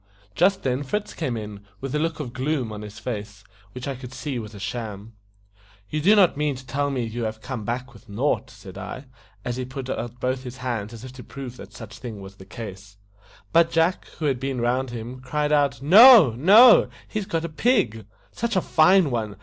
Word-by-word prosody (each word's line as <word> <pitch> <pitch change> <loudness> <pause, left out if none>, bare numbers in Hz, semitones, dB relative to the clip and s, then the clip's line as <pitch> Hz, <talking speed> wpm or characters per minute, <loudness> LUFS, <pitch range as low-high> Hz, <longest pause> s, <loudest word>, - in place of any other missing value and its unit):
Just 190 - +2
then 130 0 0
Fritz 205 +9 -3
came 130 -8 -3
in, 105 -2 -8 0.2
with 135 +2 -5
a 150 - +1
look 160 0 -2
of 125 -6 -5
gloom 130 -3 -2
on 105 0 -7
his 105 0 -10
face, 105 -2 -6 0.3
which 125 +1 -7
I 140 - -2
could 130 0 -10
see 135 -2 -4
was 110 -1 -9
a - - -9
sham. 110 -1 -6 0.8
"You 155 - -1
do 200 +7 +5
not 195 -4 +5
mean 150 -1 -1
to 130 +1 -11
tell 140 +2 -1
me 130 -3 -2
you 115 +1 -4
have 110 0 -4
come 120 -2 -6
back 125 +3 -4
with 115 0 -18
nought?" 130 +4 -1
said 100 -4 -12
I, 105 +8 -7 0.4
as 120 0 -3
he 130 - -3
put 130 0 -6
out 120 +1 -5 0.2
his 130 0 -9
hands 120 -5 -4
as 115 0 -10
if 130 -1 -9
to 130 -1 -11
prove 135 -3 -8
that - - -12
such 115 -1 -11
was 100 -5 -8
the 95 - -13
case. 100 -2 -9 0.6
But 165 0 +5
Jack, 165 +2 +1
who 155 - -3
had 135 -4 0
been 135 -1 -3
round 125 +2 0
him, 120 +2 -7
cried 150 +4 -2
out, 145 -2 +1
"No, 205 - +9
no! 205 - +7 0.2
he's 210 -3 -4
got 165 0 -2
a - - -2
pig! 125 - 0 0.2
such 235 -2 -3
a 185 - +3
fine 170 -1 +4
one. 110 -4 -3
130 Hz, 215 wpm, -24 LUFS, 115-150 Hz, 0.8 s, No